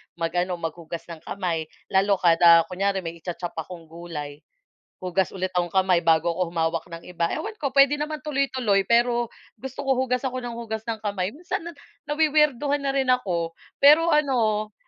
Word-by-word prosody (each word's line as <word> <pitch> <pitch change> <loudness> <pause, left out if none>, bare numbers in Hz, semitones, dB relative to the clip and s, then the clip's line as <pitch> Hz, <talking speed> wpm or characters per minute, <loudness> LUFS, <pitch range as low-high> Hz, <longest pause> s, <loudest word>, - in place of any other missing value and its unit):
mag-ano 175 +2 -1
mag-hugas 165 +1 -6
ng 165 - -8
kamay, 170 -5 -2 0.3
lalo 195 +1 +3
kada 170 -1 +6
kunyari 195 +1 0
may 165 0 -6
i-cha-chop 175 +1 -5
akong 170 +1 -8
gulay, 155 -4 -7 0.6
hugas 185 +1 -1
ulit 185 -1 -4
akong 175 -1 0
kamay 185 -2 +2
bago 160 0 +3
ako 180 -1 -2
humawak 165 -1 -1
ng 165 0 -9
iba, 170 -1 -2
ewan 430 +8 -4
ko 290 -10 -3
puwede 275 +1 +5
naman 300 +1 -3
tuloy-tuloy 260 -8 +1
pero, 235 +2 +2 0.3
gusto 265 +1 -6
ko 270 - +3
hugas 255 0 0
ako 255 -1 -3
ng 235 -1 -6
hugas 220 -2 -5
ng 225 - -3
kamay, 200 -3 -2
minsan 335 - -5 0.5
nawi-weirdohan 295 -2 +2
na 275 - 0
rin 265 - +1
ako 170 -9 -3 0.2
pero 310 +4 +6
ano 230 -8 +1
200 Hz, 165 wpm, -24 LUFS, 170-265 Hz, 0.6 s, kada